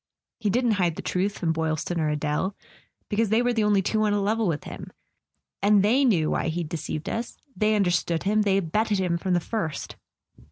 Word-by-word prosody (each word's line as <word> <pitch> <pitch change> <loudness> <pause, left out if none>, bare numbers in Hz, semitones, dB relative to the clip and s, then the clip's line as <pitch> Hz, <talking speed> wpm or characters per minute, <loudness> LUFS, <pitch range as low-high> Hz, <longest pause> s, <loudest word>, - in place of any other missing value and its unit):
He 215 -3 0
didn't 240 +3 +2
hide 170 -3 +1
the - - -7
truth 195 +3 -1
from 165 -2 0
Boylston 160 +1 -2
or 155 -1 +1
Adele, 150 +6 -1 0.5
because 220 0 0
they 225 +3 +3
were 245 0 +1
the 225 -2 +1
only 205 -2 +3
two 215 +3 0
on 210 -1 +2
a 205 - +1
level 215 +2 +1
with 155 -3 -1
him. - - -8 0.7
And 200 0 +4
they 245 +7 +3
knew 170 -11 +2
why - - 0
he'd 165 -1 -3
de¬ 165 - -2 0.2
ceived 150 - -13
us; 230 +1 -4 0.2
they 215 0 +2
understood 175 -4 +1
him, 210 +2 +2
they 200 -2 +2
abetted 205 +4 0
him 180 -2 0
from 185 0 0
the - - +3
first." 165 -5 -4
195 Hz, 210 wpm, -25 LUFS, 170-215 Hz, 0.7 s, And